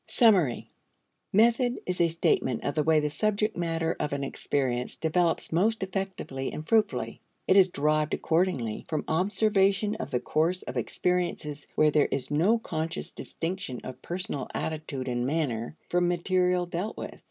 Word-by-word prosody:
Summary. 190 - +3 0.6
Method 235 +4 +3
is 180 -1 -1
a 170 - +5
statement 160 -6 +1
of 140 - -1
the 155 - +1
way 155 +1 +4
the 150 0 -1
subject 215 +4 0
matter 165 -1 -1
of 150 -1 -1
an 140 0 -2
experience 130 -2 -1
develops 165 +1 0
most 205 +6 +2
effectively 190 -8 -4
and 155 +1 -7
fruitfully. 220 -1 +1 0.3
It 185 - +5
is 190 -2 +7
derived, 155 -1 +1
accordingly, 160 - 0
from 155 -2 -2
observation 200 +3 +2
of 130 - -5
the 125 - 0
course 165 +7 0
of - - -7
experiences 175 -5 -1
where 155 0 +4
there 150 -1 +3
is 135 +1 -2
no 180 +10 +3
conscious 165 -6 -3
distinction 165 -7 -4
of 130 0 -8
personal 175 -6 -4
attitude 150 -4 -3
and 120 0 -1
manner 140 -3 -2
from 175 0 +2
material 180 0 +1
dealt 175 +5 -4
with. - - -7
165 Hz, 155 wpm, -28 LUFS, 145-190 Hz, 0.6 s, is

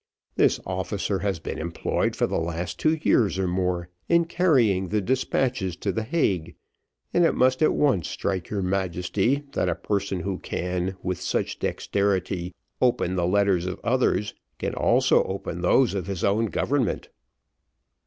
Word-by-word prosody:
This - - +3
officer 95 +1 -2
has 100 -1 -1
been 80 - -6
employed 85 +1 -1
for - - +2
the - - -1
last 85 +1 -4
two 155 +1 +3
years 105 -5 +3
or 95 -1 0
more 90 -1 -1 0.2
in 170 0 +4
carrying 125 - +2
the 105 - +1
despatches 125 -3 0
to 100 +2 -2
the 110 - -2
Hague, 100 - 0 0.6
and 175 - +4
it 165 - +3
must 130 +2 +3
at 155 - +4
once 130 - +2
strike 95 -2 -3
your 100 -2 -2
Majesty, 95 - 0
that - - 0
a - - 0
person 100 -3 -2
who 95 0 -3
can, 90 +1 -3
with 90 -2 -2
such - - -2
dexterity, 95 -3 -1 0.3
open 120 -7 +2
the 85 -1 +1
letters 95 -2 +2
of 95 - -4
others 115 -4 +1 0.2
can - - -3
also - - +3
open 90 -2 -4
those 115 +7 +3
of 95 -2 -3
his 95 -3 -4
own 110 +3 +2
government." 130 +3 -1
95 Hz, 160 wpm, -25 LUFS, 90-115 Hz, 0.6 s, in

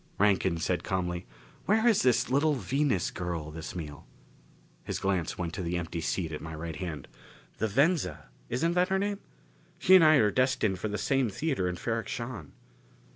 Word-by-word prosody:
Rankin 95 -4 +3
said 90 +2 -1
calmly: 90 -4 -2 0.4
"Where 220 +3 +3
is 225 -4 +4
the 125 0 +2
little 145 +2 +3
Venus 130 - 0
girl 85 -4 -4
this 80 +2 -7
meal?" 75 -5 -7 0.8
His - - -3
glance 95 -4 -1
went 85 -2 -3
to - - -4
the 90 0 -1
empty 85 -1 -4
seat 85 0 -2
at 75 - -5
my 80 -1 -6
right 80 0 -5
hand. 75 -5 -5 0.5
"The 110 - +1
Venza, 110 - +1 0.2
isn't 165 +8 +1
that 180 +1 +2
her 190 - +2
name? 200 +1 -1 0.6
She 185 - +4
and 185 -3 +9
I 155 0 +7
are 105 -7 +4
destined 125 -7 +1
for 110 - -2
the 105 0 -3
same 135 +2 +1
theater 130 - -1
in 90 - -3
Ferrok 115 +4 -2
Shahn." 115 - -6
100 Hz, 180 wpm, -29 LUFS, 85-135 Hz, 0.8 s, and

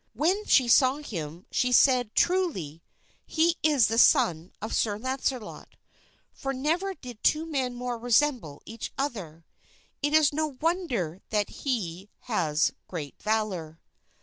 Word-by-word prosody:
When 375 +7 0
she 255 -3 +4
saw 255 +2 +5
him 175 - -7
she 250 - +1
said, 250 -3 +4
"Truly, 290 - 0 0.5
he 330 +1 +2
is 295 -6 +4
the 225 +2 +1
son 185 - +4
of 220 - -5
Sir 205 -2 0
Launcelot, 260 -1 -4 0.6
for 270 0 -4
never 340 +9 -1
did 245 -7 -11
two 310 +1 +2
men 265 -6 -2
more 245 -1 -4
resemble 240 - +1
each 225 0 -7
other; 185 - -4 0.6
it 290 +1 +1
is 305 -1 +4
no 305 -3 -2
wonder 255 - -1
that 210 -2 0
he 200 - -4
has 165 -9 0 0.2
great 150 -6 -7
valor." 195 -8 -2
245 Hz, 135 wpm, -27 LUFS, 190-295 Hz, 0.6 s, saw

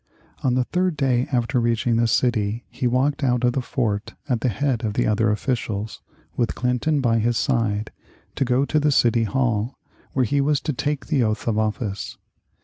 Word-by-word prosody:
On 125 -2 +1
the 125 - +2
third 180 +3 -1
day 130 -2 +1
after 120 -1 +1
reaching 115 0 +1
the 115 0 +3
city 115 -1 0
he 125 - -1
walked 135 +4 +1
out 125 -2 +1
of 120 0 +3
the 130 - 0
fort 115 -5 -2
at 125 -5 0
the 125 - +1
head 125 +1 -1
of 105 -2 -1
the - - +2
other 110 +1 +2
officials, 110 -1 -2 0.3
with 120 - 0
Clinton 130 +4 0
by 115 -3 +2
his 115 +1 +1
side, 110 -5 0 0.4
to - - 0
go 130 +2 +2
to 155 - +1
the 150 0 +2
City 120 -3 +3
Hall, 115 +1 0 0.4
where 130 -2 +2
he 140 +5 +1
was 145 0 +2
to 150 - -2
take 145 +2 -2
the 145 -5 +1
oath 110 -1 -1
of 110 -2 +1
office. 105 -2 -3
120 Hz, 195 wpm, -23 LUFS, 110-135 Hz, 0.4 s, the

